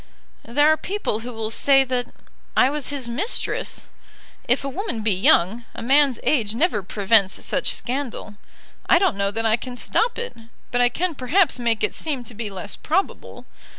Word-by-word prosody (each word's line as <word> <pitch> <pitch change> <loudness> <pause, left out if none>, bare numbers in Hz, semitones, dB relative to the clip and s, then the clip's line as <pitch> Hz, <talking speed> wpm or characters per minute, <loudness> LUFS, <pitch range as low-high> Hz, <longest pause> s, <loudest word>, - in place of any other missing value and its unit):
"There 290 +6 +2
are 315 - +3
people 385 - -3
who 245 +2 -7
will 225 -1 -4
say 270 +3 +4
that 250 -1 -2 0.5
I 260 - +5
was 295 -2 -1
his 280 -4 -3
mistress. 300 - -3 0.7
If 245 +4 +2
a - - -3
woman 350 - -3
be 215 -2 +2
young, 190 +4 +3
a - - -6
man's 270 0 +4
age 225 -7 +1
never 275 - +1
prevents 200 +1 +2
such - - 0
scandal. 250 -4 -4 0.6
I 365 - +7
don't 380 - +2
know 200 0 0
that 225 +3 -2
I 220 0 +3
can 250 +1 -8
stop 470 - 0
it, 475 +1 -5 0.4
but 245 - +2
I 245 - +5
can 350 +7 -1
perhaps 285 +3 +2
make 230 -2 0
it - - +1
seem 285 -6 -4
to 240 - -10
be 215 -1 -5
less 195 +1 -6
probable. 375 +6 -3
245 Hz, 185 wpm, -22 LUFS, 225-295 Hz, 0.7 s, I